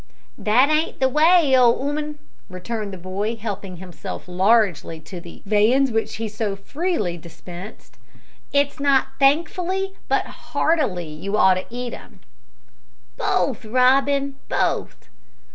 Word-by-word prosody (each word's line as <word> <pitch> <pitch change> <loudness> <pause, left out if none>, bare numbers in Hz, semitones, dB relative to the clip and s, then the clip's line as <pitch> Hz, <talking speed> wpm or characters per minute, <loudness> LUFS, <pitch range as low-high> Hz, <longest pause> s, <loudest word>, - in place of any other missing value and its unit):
"That 250 +7 +4
ain't 310 +2 0
the 265 - +4
way, 305 0 +5
old 245 -2 +5
'ooman," 295 +2 -3 0.3
returned 200 +3 -5
the 190 - -7
boy, 195 +5 -3
helping 205 -4 -6
himself 180 0 -8
largely 185 -3 +2
to 170 +3 -9
the 170 - -13
viands 225 +6 +3
which 225 0 -1
he 225 0 -3
so 210 -1 -3
freely 210 - -2
dispensed; 175 +4 -11 0.5
"it's 285 +1 +1
not 275 -2 +3
thankfully, 350 +7 +1
but - - +1
heartily, 285 - -1
you 190 +7 -3
ought 190 -3 +6
to 185 0 -4
eat 245 0 -5
'em." - - -12 0.9
"Both, 330 - 0
Robin, 270 +4 +2
both." - - -1
235 Hz, 125 wpm, -22 LUFS, 195-285 Hz, 0.9 s, ought